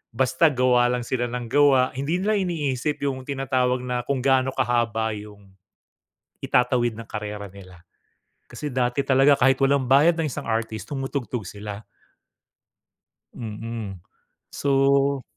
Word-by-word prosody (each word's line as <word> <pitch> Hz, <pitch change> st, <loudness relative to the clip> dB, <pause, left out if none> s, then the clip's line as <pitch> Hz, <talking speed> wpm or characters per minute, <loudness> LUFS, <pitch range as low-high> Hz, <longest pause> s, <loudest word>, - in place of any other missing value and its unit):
Basta 130 Hz, +6 st, +3 dB
gawa 125 Hz, -2 st, +3 dB
lang 125 Hz, -1 st, -1 dB
sila 120 Hz, 0 st, -2 dB
ng 125 Hz, 0 st, -4 dB
gawa. 140 Hz, -3 st, +4 dB
Hindi 140 Hz, +7 st, -2 dB
nila 215 Hz, +1 st, +2 dB
iniisip 150 Hz, -6 st, -2 dB
'yong 130 Hz, -2 st, -3 dB
tinatawag 130 Hz, -2 st, 0 dB
na 125 Hz, -1 st, -2 dB
kung 135 Hz, -2 st, -1 dB
gaano 130 Hz, -1 st, +3 dB
kahaba 120 Hz, -3 st, 0 dB
'yong 105 Hz, -2 st, -12 dB, 0.9 s
itatawid 125 Hz, -2 st, +1 dB
ng 115 Hz, -2 st, -9 dB
karera 105 Hz, -2 st, -6 dB
nila. 90 Hz, -2 st, -14 dB, 0.7 s
Kasi 150 Hz, -, -6 dB
dati 125 Hz, +1 st, 0 dB
talaga 135 Hz, +2 st, +4 dB
kahit 135 Hz, +1 st, +5 dB
walang 135 Hz, -2 st, +2 dB
bayad 145 Hz, +6 st, +6 dB
ng 160 Hz, -3 st, -1 dB
isang -, -, -6 dB
artist 110 Hz, -1 st, -2 dB
tumutugtog 135 Hz, -5 st, -4 dB
sila. 105 Hz, 0 st, -7 dB, 1.5 s
Mm. 110 Hz, -3 st, -6 dB, 0.5 s
So 140 Hz, 0 st, +2 dB
125 Hz, 130 wpm, -24 LUFS, 115-135 Hz, 1.5 s, bayad